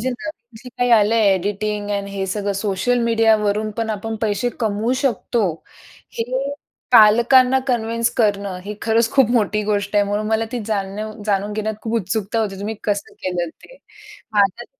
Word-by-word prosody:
जे 255 - -1
नवीन 240 -4 -8
जे 250 - -9
काय 245 0 +2
आलं 210 +2 +2
आहे, 215 -3 +4
एडिटिंग 205 +2 -2
एंड 200 -1 -2
हे 195 -1 -3
सगळं 200 +1 -2
सोशल 200 +5 0
मीडियावरून 220 -2 +2
पण 225 -1 -2
आपण 220 +2 -4
पैशे 215 +3 0
कमवू 220 +1 0
शकतो. 230 - 0 0.7
हे 230 - +1 0.7
पालकांना 245 +4 +6
कन्विन्स 230 -1 0
करणं, 200 -4 0
ही 210 - -5
खरंच 225 0 +2
खूप 265 -5 +4
मोठी 210 -3 +1
गोष्ट 205 -1 -1
आहे. 205 - +4
म्हणून 205 +1 -2
मला 220 +1 +1
ती 245 - -2
जाणणीव 210 0 -3
जाणून 205 0 0
घेण्यात 215 +1 -2
खूप 225 0 -3
उत्सुकता 205 +4 -2
होती, 195 -3 -3
तुम्ही 210 +2 -3
कसं 205 -1 -2
केलं 180 -2 -2
ते. - - -17 0.6
हां, 200 -1 +6
तर 240 - -6
215 Hz, 170 wpm, -20 LUFS, 200-230 Hz, 0.7 s, पालकांना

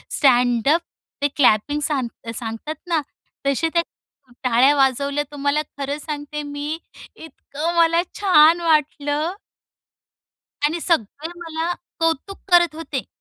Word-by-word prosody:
Stand up 250 +3 +3 0.4
ते 285 - +3
clapping 275 +2 +3
सांग 255 -6 -3
सांगतात 225 +7 -5
ना, 330 -3 +1 0.5
तसे 280 +4 +1
त्या 340 - +4 0.6
टाळ्या 255 +3 +4
वाजवल्या 280 +1 +1
तुम्हाला 285 +1 0 0.2
खरं 280 +1 -3
सांगते, 300 0 -5
मी 290 +2 -4 0.4
इतकं 320 +1 -5
मला 335 0 +4 0.2
छान 345 -4 +6
वाटलं. 305 0 +1 1.3
आणि 320 +3 +1
सगळे 310 - -1
मला 330 +1 -2 0.3
कौतुक 330 +4 -1
करत 345 -3 +5
होते. 300 -5 -4
295 Hz, 110 wpm, -21 LUFS, 275-325 Hz, 1.3 s, छान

